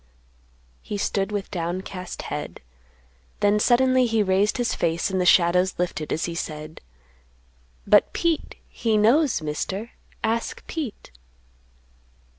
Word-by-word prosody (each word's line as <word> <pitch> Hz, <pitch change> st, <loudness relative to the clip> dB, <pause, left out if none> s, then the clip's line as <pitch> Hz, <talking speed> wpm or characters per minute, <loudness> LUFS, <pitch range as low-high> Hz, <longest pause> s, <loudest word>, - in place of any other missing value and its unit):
He 210 Hz, -, -5 dB
stood 195 Hz, 0 st, -1 dB
with 205 Hz, -2 st, -4 dB
downcast 180 Hz, +1 st, -4 dB
head; -, -, -6 dB, 0.8 s
then 205 Hz, +1 st, +3 dB
suddenly 255 Hz, +2 st, +4 dB
he 225 Hz, -2 st, +2 dB
raised 195 Hz, +4 st, +2 dB
his 245 Hz, -1 st, 0 dB
face 170 Hz, +3 st, 0 dB
and 190 Hz, -1 st, 0 dB
the 180 Hz, -, +1 dB
shadows 180 Hz, +1 st, +4 dB
lifted, 170 Hz, -3 st, -3 dB
as 160 Hz, -, 0 dB
he 170 Hz, -, -4 dB
said, 155 Hz, -1 st, -6 dB, 1.0 s
"But -, -, +5 dB
Pete 335 Hz, -3 st, -1 dB
he 225 Hz, -2 st, 0 dB
knows, 235 Hz, -, +3 dB
Mister, 190 Hz, +9 st, -3 dB, 0.3 s
ask 230 Hz, +1 st, -2 dB
Pete." 290 Hz, -, -6 dB
200 Hz, 120 wpm, -24 LUFS, 175-230 Hz, 1.0 s, But